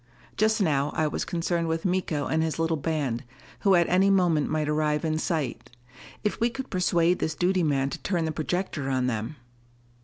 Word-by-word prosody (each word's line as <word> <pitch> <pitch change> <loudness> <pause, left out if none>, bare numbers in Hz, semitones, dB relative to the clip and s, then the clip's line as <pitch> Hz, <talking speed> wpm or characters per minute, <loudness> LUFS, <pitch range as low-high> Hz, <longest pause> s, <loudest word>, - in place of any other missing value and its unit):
Just 220 +1 +2
now 145 -7 +2
I 155 - +1
was - - -2
concerned 170 0 -1
with 160 +2 -2
Miko 175 -5 0
and 160 - 0
his 160 -1 -1
little 165 0 +1
band, 145 -5 -2 0.4
who 195 -3 +4
at 170 -1 +4
any 190 +2 +4
moment 175 -6 +3
might 155 -1 0
arrive 150 +1 0
in 155 0 0
sight. 155 -7 -2 0.5
If 210 - -1
we 235 - +2
could 265 +3 -7
persuade 180 -1 +2
this 160 - -1
duty 180 +3 +1
man 140 -4 +1
to - - -5
turn 175 -5 -1
the 160 - -1
projector 155 -3 -2
on 130 -1 +1
them! 115 +3 -2
160 Hz, 190 wpm, -26 LUFS, 150-180 Hz, 0.5 s, who